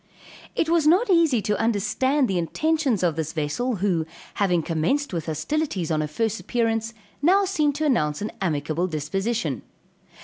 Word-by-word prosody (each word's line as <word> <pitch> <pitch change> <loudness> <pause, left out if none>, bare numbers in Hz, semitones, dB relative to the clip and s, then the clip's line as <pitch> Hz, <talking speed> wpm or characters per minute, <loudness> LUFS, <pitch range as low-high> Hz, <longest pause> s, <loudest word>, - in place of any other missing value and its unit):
It - - +1
was 330 -2 +3
not 380 +7 +4
easy 320 - +3
to 210 -1 0
understand 235 +6 +1
the 190 -4 0
intentions 280 - 0
of 170 -4 +2
this 160 -1 -3
vessel, 165 - -1
who, 165 -5 +1 0.3
having 180 -5 +1
commenced 175 - 0
with 170 -2 -3
hostilities 175 - -2
on 155 -1 +1
her 155 - -1
first 225 +8 -1
appearance 230 -1 -1 0.3
now 385 +6 +4
seemed 305 -7 +1
to 310 +1 -1
announce 150 - +1
an 210 - -4
amicable 160 0 -1
disposition. 160 - -2
210 Hz, 160 wpm, -24 LUFS, -, 0.3 s, not